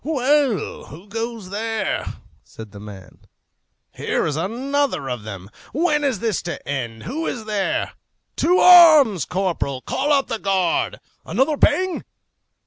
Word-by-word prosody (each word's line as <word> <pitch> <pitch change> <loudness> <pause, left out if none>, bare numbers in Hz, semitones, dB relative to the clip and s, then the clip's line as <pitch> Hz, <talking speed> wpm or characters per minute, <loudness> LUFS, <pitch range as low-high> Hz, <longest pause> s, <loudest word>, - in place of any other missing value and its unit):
"Well, 280 -5 0
who 175 +7 -13
goes 225 -3 -5
there?" 225 +2 -3 0.3
said 110 -2 -12
the 100 - -11
man. 100 -3 -12 0.7
"Here - - -1
is 150 - -2
another 250 - -1
of 125 -3 -4
them. 100 -2 -9 0.2
When 300 -1 +1
is 270 -6 0
this 225 -5 -1
to 175 - -7
end? 120 -5 -4
Who 315 +7 -4
is 225 -3 -4
there? 210 -3 -1 0.5
To 360 +2 +3
arms! 310 - +7
Corporal, 180 -8 -2
call 265 - -2
out 275 -2 +2
the 225 - -3
guard! 190 -4 0 0.2
Another 295 +4 0
bang! 370 +5 +1
220 Hz, 135 wpm, -21 LUFS, -, 0.7 s, arms